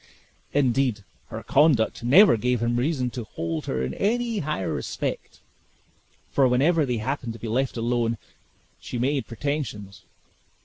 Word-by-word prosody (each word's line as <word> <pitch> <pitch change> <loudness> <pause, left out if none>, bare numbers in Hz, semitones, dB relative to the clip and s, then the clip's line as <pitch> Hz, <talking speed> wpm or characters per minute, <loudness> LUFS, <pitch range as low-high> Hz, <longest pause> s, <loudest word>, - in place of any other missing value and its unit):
Indeed, 130 -5 +1 0.2
her - - -7
conduct 135 -7 +3
never 165 - +7
gave 125 +2 0
him 120 +1 +1
reason 130 -1 0
to 120 - -5
hold 80 -6 -4
her 65 0 -1
in 65 +1 -3
any 235 0 0
higher 150 - -2
respect, - - -4 0.9
for 135 -2 +4
whenever 145 +5 +3
they 125 -1 0
happened 120 +1 -3
to 115 - -11
be 115 - -6
left 125 +3 -1
alone, 115 0 0 0.6
she - - -6
made 135 +1 0
pretensions. 115 -6 -4
125 Hz, 140 wpm, -25 LUFS, 115-145 Hz, 0.9 s, never